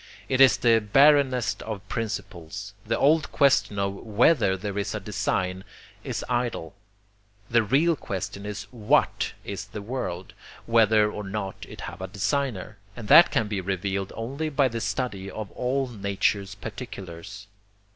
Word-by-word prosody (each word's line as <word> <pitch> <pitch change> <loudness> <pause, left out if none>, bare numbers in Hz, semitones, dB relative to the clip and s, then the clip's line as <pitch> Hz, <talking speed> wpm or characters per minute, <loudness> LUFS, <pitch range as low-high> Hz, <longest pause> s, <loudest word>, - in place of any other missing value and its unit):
It 130 0 +2
is 135 -2 +7
the 115 -2 +4
barrenest 135 +2 +4
of 105 -3 -6
principles. 100 -3 -5
The 115 - +1
old 155 +2 +3
question 140 -7 +3
of 100 0 0
WHETHER 110 -2 +3
there 100 +1 -5
is 100 0 -2
design 95 -3 -2 0.4
is - - -4
idle. 120 -9 -2 0.8
The 120 0 +5
real 145 +10 +3
question 100 -4 -5
is 105 0 -5
WHAT 110 -4 +1
is - - -5
the 105 - -8
world, 95 -6 -5 0.3
whether 110 -2 +4
or 105 - -6
not 95 -1 -5
it - - -10
have - - -7
a 95 - -4
designer 105 0 -2 0.2
and 115 -3 -8
that 170 - +9
can 110 - 0
be 100 -2 -2
revealed 95 +1 -2
only 135 +8 -3
by 140 -2 +2
the 115 -1 -4
study 100 -8 -3
of 110 -1 -7
all 130 +2 -1
nature's 100 -2 -1
particulars. 100 -3 -8
105 Hz, 145 wpm, -26 LUFS, 100-125 Hz, 0.8 s, that